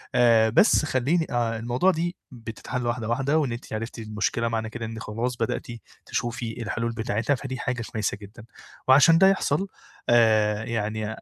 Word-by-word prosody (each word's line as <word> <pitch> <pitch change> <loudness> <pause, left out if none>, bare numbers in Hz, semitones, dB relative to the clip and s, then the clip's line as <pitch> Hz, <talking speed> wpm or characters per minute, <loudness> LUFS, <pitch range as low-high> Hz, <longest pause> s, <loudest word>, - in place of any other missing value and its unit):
آآ 115 -2 +5
بس 155 - +4
خلّيني 150 +5 +1
آآ 115 -2 0
الموضوع 120 +11 +2
دي 175 +1 -2 0.2
بتتحَل 120 +1 -5
واحدة، 120 -2 -2
واحدة 135 +6 +1
وإن 145 -6 0
أنتِ 120 0 -7
عِرفتِ 115 +2 -5
المشكلة 110 +1 -2
معنى 110 -1 -2
كده 115 0 -6
إن 110 0 -6
خلاص 115 +3 -3
بدأتِ 115 - -2 0.4
تشوفي 120 -1 -4
الحلول 115 +2 -2
بتاعتها، 115 +4 -1
فدي 130 0 -6
حاجة 125 -1 -2
كويسة 110 -3 -2
جدًا. 105 +3 -12 0.4
وعشان 145 +5 +7
ده 190 - +6
يحصل 195 -2 +1 0.4
آآ 110 -3 +4
يعني 110 -1 -3
115 Hz, 160 wpm, -25 LUFS, 110-130 Hz, 0.4 s, وعشان